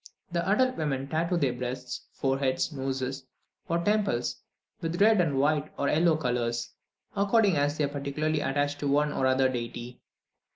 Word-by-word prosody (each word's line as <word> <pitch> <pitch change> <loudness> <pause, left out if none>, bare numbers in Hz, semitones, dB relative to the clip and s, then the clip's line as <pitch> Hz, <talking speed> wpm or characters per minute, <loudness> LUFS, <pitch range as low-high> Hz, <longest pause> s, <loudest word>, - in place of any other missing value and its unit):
The 170 0 0
adult 255 +5 +3
women 135 -3 -1
tattoo 165 +4 0
their 135 -6 +1
breasts, 125 +1 -5
foreheads, 135 +2 0
noses, 135 -1 -3 0.4
or 170 - +2
temples 200 - 0 0.4
with 165 +1 -2
red, 200 -6 +5
white, 145 +2 +1
or 140 - +1
yellow 160 +1 +3
colours, 120 -4 -1 0.4
according 205 -1 +3
as 145 +1 +1
they 150 - +1
are - - +2
particularly 145 +2 -1
attached 145 +1 -1
to 145 - -2
one 145 +1 +2
or 130 - 0
the - - +4
other 130 0 +3
deity. 120 0 -5
145 Hz, 160 wpm, -28 LUFS, 130-165 Hz, 0.4 s, red